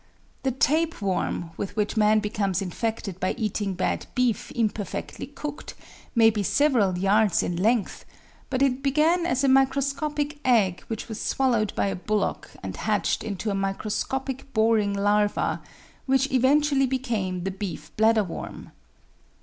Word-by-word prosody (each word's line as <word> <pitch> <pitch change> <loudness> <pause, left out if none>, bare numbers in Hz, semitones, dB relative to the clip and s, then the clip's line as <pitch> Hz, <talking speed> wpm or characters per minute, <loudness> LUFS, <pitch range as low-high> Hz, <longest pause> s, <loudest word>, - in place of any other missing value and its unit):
The 265 - 0
tapeworm, 255 - 0
with 200 - -4
which 210 0 -1
man 215 0 +4
becomes 205 -3 -1
infected 195 0 -3
by 185 - 0
eating 210 -3 -2
bad 180 - -1
beef 250 -3 +1
imperfectly 215 -3 -3
cooked, 295 0 -7 0.4
may 225 -1 +6
be 210 -1 -2
several 215 -5 +2
yards 195 0 +3
in 175 - -2
length, 215 +4 0 0.5
but 260 +1 +1
it 265 -1 +1
began 310 +6 +2
as 265 -5 0
a - - +4
microscopic 280 +2 +1
egg 210 -8 +3
which 225 -1 -5
was 220 -2 -6
swallowed 235 -6 +1
by - - +1
a 195 - -1
bullock 210 +3 -2
and - - -5
hatched - - 0
into 210 0 -3
a - - -1
microscopic 230 +7 -3
boring 220 -2 +3
larva, 205 +1 +1 0.5
which 270 +1 +2
eventually 270 +1 +3
became 220 -9 -2
the 195 - -2
beef 185 -6 -6
bladderworm. 220 -4 0
220 Hz, 140 wpm, -25 LUFS, 200-265 Hz, 0.5 s, may